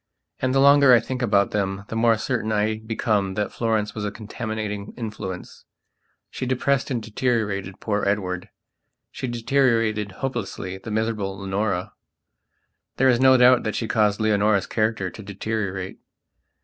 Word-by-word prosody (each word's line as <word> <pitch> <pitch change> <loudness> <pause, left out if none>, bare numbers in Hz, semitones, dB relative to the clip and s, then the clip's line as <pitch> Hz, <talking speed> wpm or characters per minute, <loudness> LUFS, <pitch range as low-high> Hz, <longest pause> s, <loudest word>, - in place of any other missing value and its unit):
And 130 - 0
the - - +4
longer 140 -1 +7
I - - +5
think 125 +3 -5
about 100 -4 +2
them 100 -1 -2
the - - -4
more 115 0 +3
certain 110 -1 -2
I 110 +1 0
become 110 -3 -1
that 105 0 -1
Florence 110 -2 -1
was 105 - -5
a 105 - -1
contaminating 105 -1 -5
influenceshe 105 -6 -7 0.8
depressed 130 +1 0
and 120 -4 -2
deteriorated 105 -5 -1
poor 105 -2 -1
Edward; 90 -3 -1 0.6
she 130 - -5
deteriorated, 115 -4 +1
hopelessly, 95 -6 -4
the 105 - -9
miserable 105 -3 -2
Leonora. 95 -1 -2 1.0
There 135 0 +4
is 120 -2 +3
no 130 0 +6
doubt 125 0 +6
that 110 - -3
she 115 - -2
caused 105 -3 +2
Leonora's 105 -2 +2
character 110 -4 -1
to 110 - -10
deteriorate. 100 -2 -4
110 Hz, 145 wpm, -23 LUFS, 100-120 Hz, 1.0 s, longer